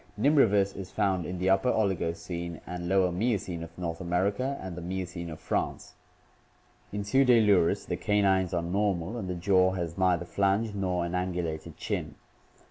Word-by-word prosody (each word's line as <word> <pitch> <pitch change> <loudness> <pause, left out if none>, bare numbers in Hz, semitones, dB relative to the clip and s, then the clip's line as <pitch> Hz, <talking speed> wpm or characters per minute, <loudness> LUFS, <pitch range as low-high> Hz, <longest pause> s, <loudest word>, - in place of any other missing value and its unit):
Nimravus 105 -8 +4
is 95 -1 -7
found 95 -5 0
in 90 - -4
the 95 +2 +2
Upper 95 +6 +3
Oligocene 85 -4 -2
and 85 0 -5
Lower 95 -1 +3
Miocene 95 -3 -1
of 85 0 -9
North 85 -1 -4
America 100 +10 0
and 95 -2 -6
the 90 - -6
Miocene 90 -1 -4
of 80 -1 -8
France. - - -3 1.0
In 105 0 -3
Pseudaiurus 110 -6 +4
the - - -3
canines 95 -3 +2
are 85 -2 -1
normal 95 +1 -1
and 95 -5 -4
the 90 - -2
jaw 95 +1 +3
has 85 -1 -4
neither 90 -2 +2
flange 100 +4 +1
nor 90 -3 -1
an 85 - -4
angulated 85 -3 -3
chin. - - -3
95 Hz, 160 wpm, -28 LUFS, 85-100 Hz, 1.0 s, Nimravus